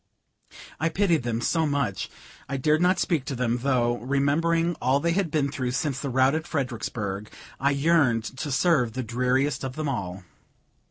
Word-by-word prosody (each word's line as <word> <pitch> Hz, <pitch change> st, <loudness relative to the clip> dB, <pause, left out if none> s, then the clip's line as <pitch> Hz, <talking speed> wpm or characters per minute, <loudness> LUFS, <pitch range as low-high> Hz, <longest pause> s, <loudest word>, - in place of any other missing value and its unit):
I 160 Hz, -, +1 dB
pitied 175 Hz, -2 st, +2 dB
them 120 Hz, -1 st, -2 dB
so 160 Hz, +5 st, +1 dB
much, 140 Hz, -10 st, -1 dB, 0.4 s
I 135 Hz, -, -1 dB
dared 150 Hz, +4 st, +2 dB
not 180 Hz, +1 st, +4 dB
speak 160 Hz, -7 st, 0 dB
to 135 Hz, -, -3 dB
them, 120 Hz, -1 st, 0 dB
though, 120 Hz, -2 st, +1 dB
remembering 160 Hz, +6 st, +1 dB
all 130 Hz, +2 st, +3 dB
they 170 Hz, +3 st, +1 dB
had 185 Hz, 0 st, 0 dB
been 145 Hz, -2 st, 0 dB
through 130 Hz, -3 st, -2 dB
since 135 Hz, -1 st, -1 dB
the 140 Hz, -, -3 dB
rout 130 Hz, +2 st, +3 dB
at 160 Hz, +1 st, -2 dB
Fredericksburg, 110 Hz, -, -3 dB, 0.3 s
I 140 Hz, -, +2 dB
yearned 140 Hz, -5 st, +3 dB, 0.2 s
to 145 Hz, -, -3 dB
serve 135 Hz, -5 st, +2 dB
the 130 Hz, -, -3 dB
dreariest 125 Hz, +4 st, 0 dB
of 130 Hz, -1 st, -4 dB
them 155 Hz, -1 st, -2 dB
all. 95 Hz, -8 st, -4 dB
140 Hz, 175 wpm, -26 LUFS, 125-155 Hz, 0.4 s, not